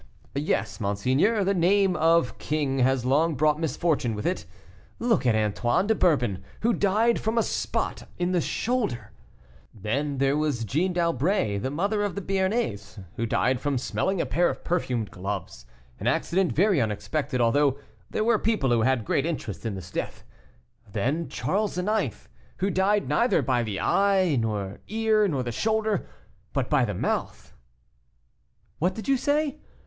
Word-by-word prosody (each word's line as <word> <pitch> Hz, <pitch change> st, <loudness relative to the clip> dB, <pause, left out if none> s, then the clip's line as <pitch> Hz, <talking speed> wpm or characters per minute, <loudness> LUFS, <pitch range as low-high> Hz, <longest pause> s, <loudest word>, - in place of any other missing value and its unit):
"Yes, 140 Hz, -2 st, -1 dB
monseigneur; 130 Hz, -, +1 dB
the 195 Hz, +1 st, +2 dB
name 190 Hz, +1 st, +3 dB
of 165 Hz, -4 st, +2 dB
king 145 Hz, -3 st, -1 dB
has 130 Hz, -1 st, +2 dB
long 150 Hz, +5 st, +2 dB
brought 150 Hz, +2 st, +2 dB
misfortune 160 Hz, -7 st, 0 dB
with 105 Hz, -, -5 dB
it. 180 Hz, +2 st, -1 dB, 0.5 s
Look 230 Hz, -, +1 dB
at 115 Hz, -, +4 dB
Antoine 110 Hz, -, +1 dB
de 220 Hz, -, +3 dB
Bourbon, 125 Hz, -, +1 dB, 0.2 s
who 235 Hz, +2 st, +2 dB
died 220 Hz, +4 st, +2 dB
from 220 Hz, +2 st, -1 dB
a 230 Hz, -, +4 dB
spot -, -, -2 dB
in 175 Hz, +1 st, 0 dB
the 180 Hz, -2 st, +2 dB
shoulder. 225 Hz, -, -2 dB, 0.6 s
Then 135 Hz, +8 st, -2 dB
there 135 Hz, +1 st, +2 dB
was 150 Hz, -7 st, 0 dB
Jeanne 170 Hz, -, 0 dB
d'Albret, 170 Hz, -, +1 dB
the 130 Hz, -, -2 dB
mother 200 Hz, +9 st, 0 dB
of 205 Hz, -2 st, -1 dB
the 200 Hz, -, -3 dB
Béarnais, 190 Hz, -, -2 dB
who 115 Hz, -, -2 dB
died 125 Hz, +3 st, +1 dB
from 145 Hz, -2 st, 0 dB
smelling 190 Hz, +9 st, -1 dB
a -, -, +1 dB
pair 175 Hz, +1 st, +2 dB
of -, -, -6 dB
perfumed 125 Hz, -, -1 dB
gloves, 95 Hz, -10 st, -6 dB, 0.3 s
an -, -, -3 dB
accident 185 Hz, 0 st, +1 dB
very 190 Hz, -3 st, +3 dB
unexpected 110 Hz, +5 st, -2 dB
although 135 Hz, +4 st, +3 dB, 0.3 s
there -, -, -1 dB
were 225 Hz, -1 st, +3 dB
people 210 Hz, -, +1 dB
who 115 Hz, -1 st, +3 dB
had 130 Hz, -2 st, +1 dB
great 140 Hz, +7 st, +1 dB
interest 115 Hz, -, -4 dB
in 105 Hz, -, -3 dB
this 90 Hz, -2 st, -9 dB
death. -, -, -4 dB, 0.7 s
Then 150 Hz, +10 st, -1 dB
Charles 205 Hz, -1 st, -1 dB
IX., 190 Hz, -, -1 dB, 0.3 s
who 195 Hz, +2 st, 0 dB
died 200 Hz, +2 st, +2 dB
neither 235 Hz, -, +2 dB
by 125 Hz, -1 st, +1 dB
the 105 Hz, -4 st, -3 dB
eye, 195 Hz, -5 st, +3 dB
the 105 Hz, -4 st, -2 dB
ear, 220 Hz, -1 st, +2 dB
nor 140 Hz, -8 st, -1 dB
the 120 Hz, -, -3 dB
shoulder, 215 Hz, -, 0 dB, 0.5 s
but 135 Hz, -1 st, -1 dB
by 140 Hz, -4 st, +4 dB
the 105 Hz, -4 st, -3 dB
mouth -, -, -3 dB, 0.6 s
" -, -, -42 dB
"What 180 Hz, +3 st, +1 dB
do 225 Hz, +5 st, -2 dB
you 270 Hz, -, +4 dB
say?" 295 Hz, +1 st, 0 dB
155 Hz, 165 wpm, -26 LUFS, 120-195 Hz, 0.7 s, at